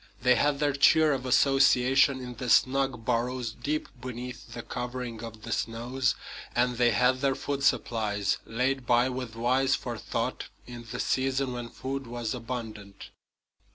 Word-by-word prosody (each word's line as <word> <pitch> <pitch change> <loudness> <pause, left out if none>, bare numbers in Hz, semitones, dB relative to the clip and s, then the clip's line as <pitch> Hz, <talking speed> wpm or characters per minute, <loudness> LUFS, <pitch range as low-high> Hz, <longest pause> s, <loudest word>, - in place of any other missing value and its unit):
They 125 0 +6
had 145 +3 +2
their 145 0 +1
cheer 150 +2 +5
of 130 -1 -3
association 135 0 +4
in 125 -1 -6
the 125 0 -4
snug 130 -2 +2
burrows 125 0 -1
deep 145 +7 -3
beneath 125 -1 -7
the 120 - -6
covering 125 -2 -5
of 110 -2 -9
the - - -6
snows; 120 +4 -1 0.4
and 125 0 +1
they 120 0 +4
had 125 +3 +2
their 135 -1 +2
food 140 -1 -3
supplies, 105 -6 +1
laid 125 +2 -1
by 120 +1 +4
with 125 -3 -5
wise 130 +3 +2
forethought - - -4 0.2
in 120 -1 -10
the - - -5
season 130 0 0
when 120 -1 -5
food 135 +1 -5
was 120 -2 -3
abundant. 110 -5 -7
125 Hz, 155 wpm, -28 LUFS, 120-135 Hz, 0.4 s, They